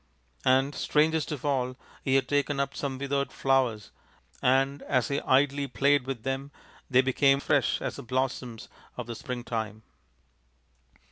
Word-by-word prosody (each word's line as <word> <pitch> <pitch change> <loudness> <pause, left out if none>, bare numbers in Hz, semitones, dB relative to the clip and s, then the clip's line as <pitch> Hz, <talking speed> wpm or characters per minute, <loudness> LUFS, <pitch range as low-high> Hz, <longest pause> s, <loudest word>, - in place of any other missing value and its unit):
And, 135 +2 +3
strangest 155 +2 +1
of 150 -2 -5
all, 130 -3 0 0.3
he 135 - +2
had 135 - +2
taken 145 -1 0
up 140 0 -1
some 135 -2 -3
withered 140 +1 -1
flowers 130 -6 +1 0.5
and 135 +2 +2
as 125 -5 0
he 140 0 0
idly 140 +1 +2
played 140 0 +2
with 130 -5 -4
them 135 +1 -3 0.4
they 130 -1 +5
became 135 +1 +3
as 140 - -7
fresh - - +2
as - - -3
the - - -6
blossoms 125 -2 -3 0.3
of 125 - -4
the 120 - -5
springtime." 110 -3 -5
135 Hz, 150 wpm, -28 LUFS, 125-140 Hz, 0.5 s, they